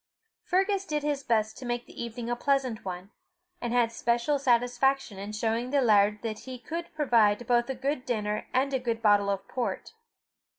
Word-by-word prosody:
Fergus 390 Hz, +2 st, +1 dB
did 300 Hz, -4 st, -2 dB
his 290 Hz, -2 st, -1 dB
best 220 Hz, -3 st, 0 dB
to 260 Hz, -, -8 dB
make 240 Hz, 0 st, -2 dB
the -, -, -7 dB
evening 235 Hz, 0 st, -6 dB
a 240 Hz, -, 0 dB
pleasant 260 Hz, -3 st, 0 dB
one, 185 Hz, +1 st, -6 dB, 0.5 s
and 240 Hz, -, -2 dB
had 240 Hz, -2 st, +2 dB
special 235 Hz, +5 st, 0 dB
satisfaction 245 Hz, -3 st, +1 dB
in 200 Hz, +2 st, -6 dB
showing 225 Hz, +3 st, -1 dB
the 285 Hz, +1 st, +2 dB
laird 210 Hz, -4 st, +3 dB
that 215 Hz, -2 st, -3 dB
he 255 Hz, +1 st, -8 dB
could 335 Hz, +9 st, -6 dB
provide 240 Hz, -6 st, +3 dB
both 240 Hz, +1 st, +2 dB
a 265 Hz, -, -2 dB
good 270 Hz, +1 st, -2 dB
dinner 210 Hz, -4 st, -2 dB
and 270 Hz, +2 st, +1 dB
a 265 Hz, -, +2 dB
good 230 Hz, -2 st, -3 dB
bottle 205 Hz, -1 st, +4 dB
of 195 Hz, 0 st, -2 dB
port. 250 Hz, -, -3 dB
240 Hz, 185 wpm, -28 LUFS, 215-270 Hz, 0.5 s, bottle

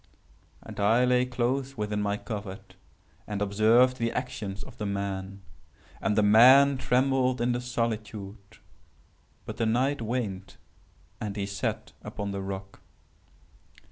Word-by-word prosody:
And -, -, -9 dB
I 115 Hz, +5 st, +4 dB
lay 125 Hz, 0 st, +2 dB
close 130 Hz, +2 st, -2 dB
within 105 Hz, -1 st, -2 dB
my 100 Hz, 0 st, -1 dB
covert 100 Hz, -3 st, -7 dB, 0.5 s
and 105 Hz, -1 st, -3 dB
observed 110 Hz, +5 st, +3 dB
the 115 Hz, -1 st, -1 dB
actions 105 Hz, -6 st, -5 dB
of -, -, -14 dB
the 105 Hz, -, -3 dB
man. 100 Hz, -1 st, -4 dB, 0.6 s
And 105 Hz, -, 0 dB
the 105 Hz, -, +4 dB
man 130 Hz, +6 st, +7 dB
trembled 130 Hz, 0 st, +1 dB
in 120 Hz, +1 st, +1 dB
the 120 Hz, 0 st, -1 dB
solitude;—but 110 Hz, -4 st, -7 dB
the 115 Hz, -, 0 dB
night 130 Hz, +4 st, +1 dB
waned 105 Hz, -5 st, -4 dB, 0.6 s
and 105 Hz, -3 st, -4 dB
he 100 Hz, -2 st, -2 dB
sat 100 Hz, 0 st, -4 dB
upon 100 Hz, -1 st, -5 dB
the 100 Hz, 0 st, -4 dB
rock. 95 Hz, 0 st, -7 dB
110 Hz, 130 wpm, -27 LUFS, 100-125 Hz, 0.6 s, man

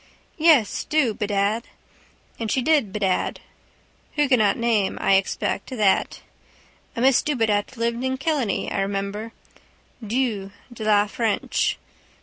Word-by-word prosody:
Yes, 305 Hz, -, +4 dB
do 290 Hz, -8 st, +1 dB
bedad. 205 Hz, +2 st, -1 dB, 0.7 s
And 225 Hz, -1 st, -3 dB
she 260 Hz, -, 0 dB
did 295 Hz, -9 st, +2 dB
bedad. 195 Hz, -2 st, -1 dB, 0.7 s
Huguenot 255 Hz, -9 st, +3 dB
name 225 Hz, -5 st, +1 dB
I -, -, +2 dB
expect 190 Hz, 0 st, 0 dB
that. 215 Hz, -7 st, +1 dB, 0.7 s
A 230 Hz, -, -3 dB
miss 265 Hz, 0 st, +4 dB
Dubedat 225 Hz, -4 st, 0 dB
lived 235 Hz, +1 st, -1 dB
in 260 Hz, 0 st, -1 dB
Killiney, 270 Hz, -, -1 dB
I -, -, -1 dB
remember. 200 Hz, +3 st, -3 dB, 0.7 s
Du 215 Hz, -3 st, -1 dB, 0.2 s
de 220 Hz, -, -7 dB
la 210 Hz, -1 st, +4 dB
is 205 Hz, -, -9 dB
French. 225 Hz, -4 st, 0 dB
225 Hz, 125 wpm, -23 LUFS, 205-255 Hz, 0.7 s, Yes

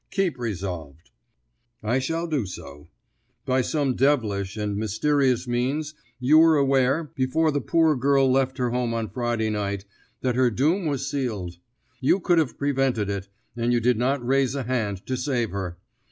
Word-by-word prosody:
Keep 185 Hz, -9 st, -1 dB
resolved." 90 Hz, -, -5 dB, 0.7 s
"I 120 Hz, +5 st, +1 dB
shall 165 Hz, +6 st, -2 dB
do 145 Hz, -, -1 dB
so. 75 Hz, -5 st, -10 dB, 0.6 s
By 130 Hz, 0 st, +2 dB
some 140 Hz, 0 st, 0 dB
devilish 110 Hz, -8 st, +1 dB
and 105 Hz, -1 st, -2 dB
mysterious 125 Hz, +5 st, +1 dB
means 135 Hz, +6 st, -1 dB, 0.3 s
you 140 Hz, +5 st, +5 dB
were 160 Hz, -1 st, +6 dB
aware, 140 Hz, +2 st, +2 dB
before 155 Hz, +3 st, +1 dB
the 145 Hz, -1 st, -1 dB
poor 160 Hz, +2 st, +3 dB
girl 135 Hz, +1 st, +3 dB
left 130 Hz, 0 st, +1 dB
her 125 Hz, -2 st, 0 dB
home 120 Hz, -1 st, -1 dB
on 115 Hz, -2 st, -3 dB
Friday 120 Hz, -3 st, -1 dB
night, 100 Hz, -2 st, -3 dB, 0.4 s
that 130 Hz, -1 st, +1 dB
her 125 Hz, 0 st, +3 dB
doom 155 Hz, -, +1 dB
was 140 Hz, -2 st, -2 dB
sealed. 110 Hz, -11 st, -3 dB, 0.4 s
You 135 Hz, +8 st, +3 dB
could 175 Hz, -2 st, +3 dB
have 155 Hz, -5 st, -1 dB
prevented 135 Hz, -7 st, 0 dB
it, 100 Hz, 0 st, -5 dB, 0.3 s
and 120 Hz, 0 st, 0 dB
you 120 Hz, -, +3 dB
did 120 Hz, 0 st, +2 dB
not 130 Hz, +1 st, 0 dB
raise 135 Hz, +1 st, +2 dB
a 140 Hz, -, -2 dB
hand 110 Hz, -6 st, -2 dB
to 130 Hz, -, -2 dB
save 125 Hz, -3 st, -1 dB
her. 90 Hz, -3 st, -4 dB
125 Hz, 170 wpm, -25 LUFS, 110-140 Hz, 0.7 s, were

